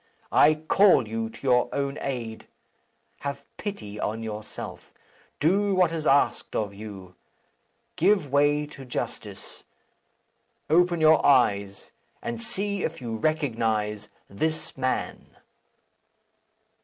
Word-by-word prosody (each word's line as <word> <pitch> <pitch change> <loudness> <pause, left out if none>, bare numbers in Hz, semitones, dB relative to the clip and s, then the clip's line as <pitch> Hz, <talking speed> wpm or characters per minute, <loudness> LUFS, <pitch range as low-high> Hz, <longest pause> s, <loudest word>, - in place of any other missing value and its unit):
I 155 +1 +6
call 155 - +4
you 115 +1 -3
to - - -14
your 125 -2 +3
own 140 0 -2
aid. 120 -5 -5 0.7
Have 140 0 -5
pity 105 - -6
on 110 +2 -2
yourself. 105 -1 -7 0.5
Do 195 +5 +2
what 180 -3 +3
is 160 -2 -3
asked 140 +1 +2
of 105 -2 -1
you. 100 -3 -9 0.8
Give 190 -10 +3
way 145 +1 +3
to 140 -2 -11
justice. 125 - -6 1.1
Open 175 0 +4
your 155 0 +6
eyes, 100 -8 +2 0.3
and 120 -1 -5
see 200 - -2
if 165 +1 -3
you 115 -3 -4
recognize 110 -7 -1 0.2
this 155 +10 -3
man!" 130 -1 -3
135 Hz, 110 wpm, -26 LUFS, 110-155 Hz, 1.1 s, I